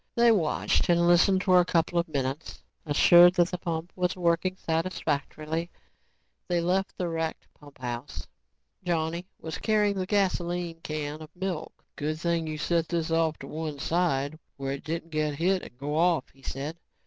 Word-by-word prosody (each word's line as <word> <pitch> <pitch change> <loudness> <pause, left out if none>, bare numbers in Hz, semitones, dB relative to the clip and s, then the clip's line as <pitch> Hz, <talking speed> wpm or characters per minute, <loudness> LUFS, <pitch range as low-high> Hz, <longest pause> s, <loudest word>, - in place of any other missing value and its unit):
They 235 0 +6
watched 180 -5 +1
and 170 0 +4
listened 185 +2 +4
for 185 -1 +5
a - - +5
couple 170 0 +1
of 170 - -1
minutes. 140 0 -4 0.2
Assured 175 +4 +7
that 175 -1 +3
the 180 - -3
pump 170 -1 -4
was 180 0 0
working 180 +1 +1
satisfactorily, 160 -1 -2 0.8
they 175 -1 +1
left 185 +3 0
the 180 - -1
wrecked 165 -1 -3
pumphouse. 125 - -7 0.6
Johnny 170 0 -1
was 160 - -6
carrying 210 -2 +2
the 185 - -2
gasoline 175 -4 0
can 155 -1 -4
of 155 - -9
milk. 180 -3 -5
"Good 155 +1 -3
thing 170 -1 0
you 155 0 -4
set 165 +1 0
this 165 -2 -1
off 165 -1 +2
to - - -9
one 155 -1 -4
side 155 -2 0 0.2
where 135 -1 -3
it 140 - -5
didn't 165 +1 -4
get 155 -1 0
hit 180 +5 +1
and 120 - -12
go 145 +3 -3
off," 170 +1 +2
he 135 - -22
said. 140 +5 -5
165 Hz, 170 wpm, -27 LUFS, 155-180 Hz, 0.8 s, Assured